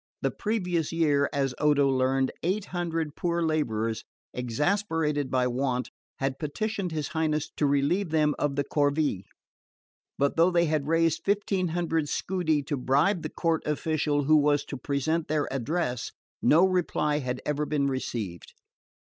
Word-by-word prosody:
The -, -, +2 dB
previous 180 Hz, -7 st, -1 dB
year, 150 Hz, -4 st, +2 dB
as 135 Hz, -3 st, 0 dB
Odo 145 Hz, -2 st, +4 dB
learned, 130 Hz, 0 st, +1 dB
eight 190 Hz, +4 st, -1 dB
hundred 165 Hz, -4 st, -2 dB
poor 170 Hz, -1 st, 0 dB
labourers, 115 Hz, -9 st, -1 dB, 0.3 s
exasperated 150 Hz, -, 0 dB
by 130 Hz, -1 st, +2 dB
want, 125 Hz, 0 st, -1 dB, 0.3 s
had 135 Hz, 0 st, -2 dB
petitioned 195 Hz, +4 st, -2 dB
his 155 Hz, -3 st, -3 dB
Highness 155 Hz, -2 st, -1 dB
to 145 Hz, -, +2 dB
relieve 145 Hz, +7 st, +1 dB
them 150 Hz, -1 st, +2 dB
of 145 Hz, -2 st, 0 dB
the 145 Hz, -, +1 dB
corvee; 145 Hz, -8 st, 0 dB, 0.9 s
but 140 Hz, +2 st, +1 dB
though 165 Hz, +2 st, +5 dB
they 170 Hz, -1 st, +3 dB
had 155 Hz, -3 st, 0 dB
raised 165 Hz, 0 st, +2 dB
fifteen 200 Hz, -2 st, +1 dB
hundred 165 Hz, -2 st, -1 dB
scudi 160 Hz, -6 st, 0 dB
to 140 Hz, +1 st, -2 dB
bribe 145 Hz, +9 st, +2 dB
the 155 Hz, -, -4 dB
court 165 Hz, 0 st, 0 dB
official 150 Hz, -1 st, 0 dB
who 155 Hz, +2 st, +5 dB
was 145 Hz, 0 st, +2 dB
to -, -, -6 dB
present 150 Hz, +5 st, -1 dB
their 150 Hz, -1 st, 0 dB
address, 130 Hz, -1 st, -2 dB, 0.3 s
no 165 Hz, +5 st, +5 dB
reply 165 Hz, -5 st, +1 dB
had 125 Hz, -2 st, -3 dB
ever 150 Hz, 0 st, -1 dB
been 145 Hz, -2 st, +1 dB
received. 115 Hz, -, -4 dB
150 Hz, 150 wpm, -27 LUFS, 140-165 Hz, 0.9 s, though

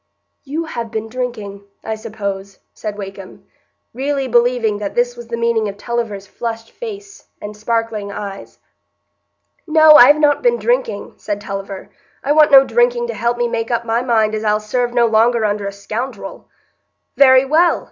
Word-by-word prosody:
"You 310 Hz, +4 st, -4 dB
have 235 Hz, -7 st, -5 dB
been 220 Hz, 0 st, -5 dB
drinking, 220 Hz, -5 st, -5 dB, 0.2 s
I 220 Hz, -, -3 dB
suppose," 200 Hz, -3 st, -6 dB, 0.2 s
said 210 Hz, -1 st, -6 dB
Wakem, 195 Hz, -1 st, -9 dB, 0.5 s
really 275 Hz, +2 st, -2 dB
believing 240 Hz, -3 st, +2 dB
that 200 Hz, -1 st, -5 dB
this 245 Hz, 0 st, +1 dB
was 240 Hz, -1 st, -10 dB
the 235 Hz, 0 st, -4 dB
meaning 230 Hz, -2 st, +1 dB
of 200 Hz, -, -9 dB
Tulliver's 225 Hz, -4 st, -4 dB
flushed 225 Hz, +2 st, -6 dB
face 410 Hz, -3 st, -9 dB
and 210 Hz, 0 st, -8 dB
sparkling 220 Hz, -1 st, -2 dB
eyes. 200 Hz, -1 st, -8 dB, 1.1 s
"No, 315 Hz, -1 st, +7 dB
I've 290 Hz, +4 st, +7 dB
not 295 Hz, -1 st, +3 dB
been 480 Hz, -1 st, +2 dB
drinking," -, -, -1 dB
said 205 Hz, -1 st, -4 dB
Tulliver; 195 Hz, -1 st, -7 dB, 0.3 s
"I 280 Hz, -, 0 dB
want 305 Hz, 0 st, +5 dB
no 270 Hz, -1 st, +8 dB
drinking 240 Hz, 0 st, +1 dB
to -, -, -2 dB
help 235 Hz, +2 st, -1 dB
me 240 Hz, 0 st, 0 dB
make 230 Hz, -1 st, -3 dB
up 235 Hz, -1 st, -1 dB
my 230 Hz, +1 st, 0 dB
mind 220 Hz, -4 st, +1 dB
as 215 Hz, 0 st, -3 dB
I'll 210 Hz, 0 st, +2 dB
serve 240 Hz, +3 st, -2 dB
no 240 Hz, -1 st, +3 dB
longer 225 Hz, 0 st, +2 dB
under 205 Hz, -1 st, -1 dB
a -, -, -3 dB
scoundrel." 215 Hz, +1 st, -6 dB, 0.7 s
"Very 260 Hz, -1 st, +6 dB
well! 325 Hz, +5 st, +3 dB
235 Hz, 165 wpm, -18 LUFS, 210-255 Hz, 1.1 s, no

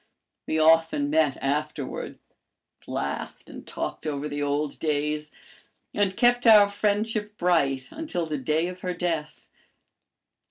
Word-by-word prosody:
We 160 Hz, -, 0 dB
often 160 Hz, -2 st, +3 dB
met 155 Hz, -3 st, +2 dB
afterward, 145 Hz, 0 st, -3 dB, 0.7 s
laughed -, -, -5 dB
and -, -, -11 dB
talked -, -, -5 dB
over 145 Hz, 0 st, -2 dB
the 145 Hz, 0 st, -4 dB
old 145 Hz, +1 st, -1 dB
days, 150 Hz, 0 st, -1 dB, 0.6 s
and 200 Hz, -2 st, 0 dB
kept 245 Hz, 0 st, +3 dB
our 210 Hz, -2 st, +8 dB
friendship 210 Hz, +1 st, -1 dB
bright 140 Hz, -7 st, +1 dB
until 300 Hz, -, -3 dB
the 155 Hz, -3 st, -3 dB
day 155 Hz, +6 st, 0 dB
of 180 Hz, 0 st, -8 dB
her 180 Hz, -1 st, -3 dB
death. 165 Hz, -3 st, -3 dB
160 Hz, 125 wpm, -26 LUFS, 150-195 Hz, 0.7 s, our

